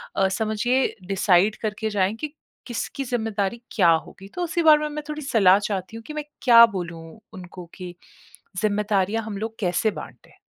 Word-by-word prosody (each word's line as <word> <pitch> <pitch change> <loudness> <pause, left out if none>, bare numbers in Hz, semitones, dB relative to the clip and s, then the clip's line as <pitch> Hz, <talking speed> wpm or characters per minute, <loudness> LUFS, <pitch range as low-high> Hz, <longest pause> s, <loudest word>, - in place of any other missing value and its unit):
अ, 195 - +3
समझिए 220 +5 0
डिसाइड 195 +1 +3
करके 215 0 -3
जाएँ 200 0 0
कि 300 +4 -6 0.3
किसकी 245 +3 -4
जिम्मेदारी 225 -2 -2
क्या 180 -6 +3 0.2
होगी। 195 - -13
तो 355 - -2
उसी 340 0 -1
बारे 310 -1 +7
में 300 - -2
मैं 300 0 -6
थोड़ी 300 0 -5
सलाह 205 -8 +4
चाहती 200 +2 -4
हूँ 230 - -11
कि 305 - -7
मैं 300 -1 -4 0.2
क्या 235 -2 +9
बोलूँ 170 -2 -6 0.3
उनको 180 -1 -10
कि 180 -2 -9 0.7
जिम्मेदारियाँ 210 0 0
हम 210 -2 -6
लोग 220 +2 -5
कैसे 185 +3 0
बाँटे? - - -11
215 Hz, 170 wpm, -23 LUFS, 190-240 Hz, 0.7 s, क्या